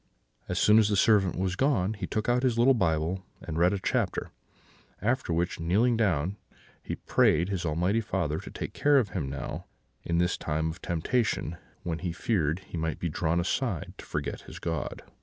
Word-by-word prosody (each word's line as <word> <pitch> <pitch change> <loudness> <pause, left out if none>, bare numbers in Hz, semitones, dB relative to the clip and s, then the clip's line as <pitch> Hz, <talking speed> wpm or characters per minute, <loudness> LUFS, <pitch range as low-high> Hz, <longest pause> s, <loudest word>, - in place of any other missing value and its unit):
As - - -1
soon 105 +1 +6
as 110 -1 +4
the 105 - +2
servant 100 -2 +4
was 90 0 0
gone, 110 -6 +2
he 105 - -5
took 110 - -2
out 120 +1 +3
his 130 -3 +2
Bible 95 -8 +2 0.2
and 80 -1 -4
read 90 +2 +5
a 100 - 0
chapter; 95 - -1 0.7
after 120 -2 0
which, 85 +1 0
kneeling 105 +9 +3
down, 95 -4 +1 0.4
he - - -4
prayed 85 +5 +2
his 90 -4 -2
Almighty 90 +8 +1
Father 85 -7 -1
to - - -9
take - - -6
care 145 0 +4
of 120 -7 +2
him 85 -7 -3
now, 70 - -5 0.4
in 85 - 0
this 90 +1 +2
time 80 +1 -1
of 85 +2 -12
temptation, 95 0 0 0.3
when 85 -2 -2
he 90 -1 -2
feared 85 -4 0
he 85 - -7
might 80 0 -1
be 85 - -2
drawn 85 +2 0
aside 95 - -1
to - - -9
forget - - -3
his - - -10
God. 80 -2 -3
90 Hz, 190 wpm, -28 LUFS, 80-110 Hz, 0.7 s, soon